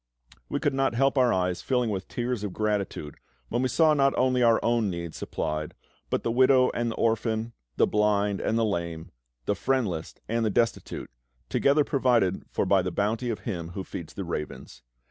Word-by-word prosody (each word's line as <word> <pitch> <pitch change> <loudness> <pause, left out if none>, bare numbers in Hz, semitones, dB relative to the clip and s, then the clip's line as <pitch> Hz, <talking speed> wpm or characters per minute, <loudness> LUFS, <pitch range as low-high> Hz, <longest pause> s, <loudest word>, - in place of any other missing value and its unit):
We - - -1
could 145 - 0
not 135 -3 +1
help 135 +3 +3
our 125 -3 +4
eyes 90 -1 0
filling 125 -4 0
with 95 -2 -4
tears 120 -3 -3
of 100 -3 -4
gratitude 100 -8 -2 0.3
when 120 - 0
we 130 - +2
saw 155 +4 +4
not 140 -2 +2
only 130 -1 +2
our 115 -2 +5
own 115 -3 +2
needs 85 -2 -5
supplied, 75 0 -3 0.3
but - - -1
the 115 - 0
widow 130 +1 +5
and 120 0 -1
the 115 - -4
orphan, 115 0 0 0.2
the - - +4
blind 105 -1 +1
and 110 - 0
the 115 - +2
lame, 85 -5 -3 0.3
the - - +1
friendless 100 -8 -1
and 115 +1 0
the 110 - +2
destitute, 115 - -1 0.4
together 145 +2 +3
provided 120 -10 +2
for - - -1
by - - +4
the - - -2
bounty 110 +4 -1
of 110 - -3
Him 85 -7 -5
who 95 - -2
feeds 85 -3 -8
the 100 - -4
ravens. 75 -6 -6
115 Hz, 190 wpm, -27 LUFS, 95-125 Hz, 0.4 s, our